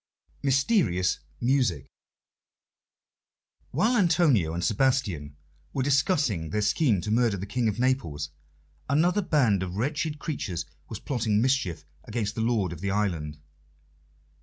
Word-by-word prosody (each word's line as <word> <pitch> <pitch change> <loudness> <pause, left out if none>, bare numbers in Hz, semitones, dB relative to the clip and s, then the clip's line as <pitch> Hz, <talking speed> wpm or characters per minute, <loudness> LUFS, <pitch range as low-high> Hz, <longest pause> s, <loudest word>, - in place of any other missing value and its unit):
Mysterious 135 - +2 0.2
Music 120 - +1 1.8
While 215 - +2
Antonio 160 - +3
and 85 - -2
Sebastian 100 - 0 0.4
were 135 - 0
discussing 135 - +1
their 105 +6 -1
scheme 105 - +2
to 105 - -4
murder 115 -2 +2
the 95 - -5
King 115 +3 -1
of 105 -1 -1
Naples, 85 - -1 0.6
another 175 +8 +3
band 125 - +2
of 90 -1 -4
wretched 150 - -1
creatures 110 - -4 0.2
was - - -5
plotting 110 -6 0
mischief 110 - 0 0.2
against 110 -2 -3
the 110 - -3
lord 110 -7 0
of 85 - -10
the 100 - -1
island. 85 -7 -1
115 Hz, 125 wpm, -27 LUFS, 95-140 Hz, 1.8 s, Antonio